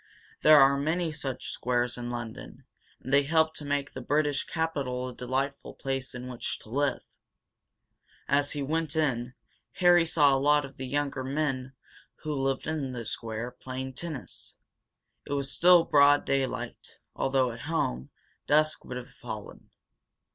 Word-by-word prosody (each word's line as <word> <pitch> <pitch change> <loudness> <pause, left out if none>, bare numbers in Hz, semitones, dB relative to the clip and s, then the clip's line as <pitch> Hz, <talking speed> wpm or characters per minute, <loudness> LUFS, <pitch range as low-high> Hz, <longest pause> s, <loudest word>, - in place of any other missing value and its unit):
There 155 -1 +8
are 140 0 +5
many 160 +3 0
such 140 -4 -5
squares 120 0 0
in 120 0 -5
London, 120 -2 -7 0.4
and 130 - -5
they 140 - +7
help 160 +2 +2
to 155 - -9
make 145 -1 -2
the 130 - -6
British 145 +2 +1
capital 140 -6 -2
a - - -8
delightful 135 +3 -3
place 135 -1 -4
in 125 0 -6
which 125 -2 -4
to - - -15
live. 140 +2 0 1.2
As 145 +1 +2
he 145 -2 -2
went 155 +1 -1
in, 130 -5 0 0.4
Harry 175 -2 +5
saw 145 -4 +4
a 135 - +1
lot 145 0 +4
of 135 -1 -13
the 130 - -5
younger 140 -1 -1
men 135 -2 -2 0.5
who 155 - -2
lived 135 -1 -1
in 150 -5 -2
the 120 -2 -5
square 115 +2 -4
playing 130 +1 -6
tennis. 155 -1 -7 0.7
It - - -3
was 140 -1 -1
still 175 -1 +6
broad 145 -1 +5
daylight, 135 -1 -2 0.2
although, 135 -2 +1
at 115 - -9
home, 65 - -1 0.4
dusk 155 +1 +3
would 125 - -6
have 125 0 -9
fallen. 110 -4 -9
140 Hz, 155 wpm, -28 LUFS, 125-150 Hz, 1.2 s, There